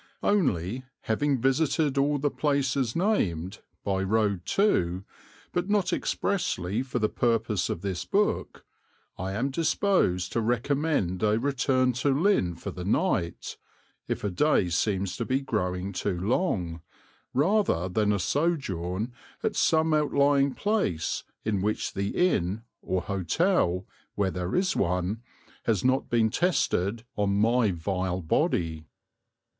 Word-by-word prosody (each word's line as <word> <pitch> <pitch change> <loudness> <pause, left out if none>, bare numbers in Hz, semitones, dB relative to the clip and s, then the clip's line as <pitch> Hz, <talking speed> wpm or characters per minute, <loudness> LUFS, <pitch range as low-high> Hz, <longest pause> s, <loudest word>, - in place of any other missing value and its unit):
Only, 130 - +1 0.2
having 135 +4 0
visited 140 +3 +1
all 145 +1 +2
the 145 0 0
places 135 -4 0
named, 100 - 0 0.2
by 95 -1 0
road 100 -2 0
too, 95 - +1 0.5
but 175 +2 -1
not 205 -3 +2
expressly 110 - -1
for 130 -2 -3
the 110 -2 +2
purpose 115 -4 0
of 85 - -3
this 95 -3 -3
book, 205 - -1 0.5
I 95 +1 -3
am 125 +7 -1
disposed 155 - +1
to 115 - 0
recommend 120 - 0
a 105 0 +3
return 130 0 +1
to 140 0 +2
Lynn 165 - +2
for - - -6
the 90 - -7
night, 100 - -1 0.5
if - - -3
a 105 - -1
day 100 -3 +2
seems 95 +1 0
to - - -1
be 130 +1 0
growing 95 -7 -2
too 90 0 -2
long, 90 - -1 0.5
rather 150 - +2
than 105 +3 +1
a 105 - +2
sojourn 110 - -1 0.3
at - - 0
some 160 0 +3
outlying 140 -2 +3
place 200 - -1 0.2
in 105 -3 0
which 105 +2 -1
the 100 +1 -1 0.2
inn 95 +5 -2 0.2
or 95 -1 -1
hotel, 100 - +1 0.3
where 100 -2 +1
there 90 0 -3
is 185 0 +1
one, 90 +4 0 0.4
has 110 0 +1
not 130 +1 +2
been 115 -2 +2
tested 115 - 0
on 100 -1 +1
my 115 +1 +3
vile 90 +1 -2
body. 80 0 0
110 Hz, 135 wpm, -27 LUFS, 95-145 Hz, 0.5 s, a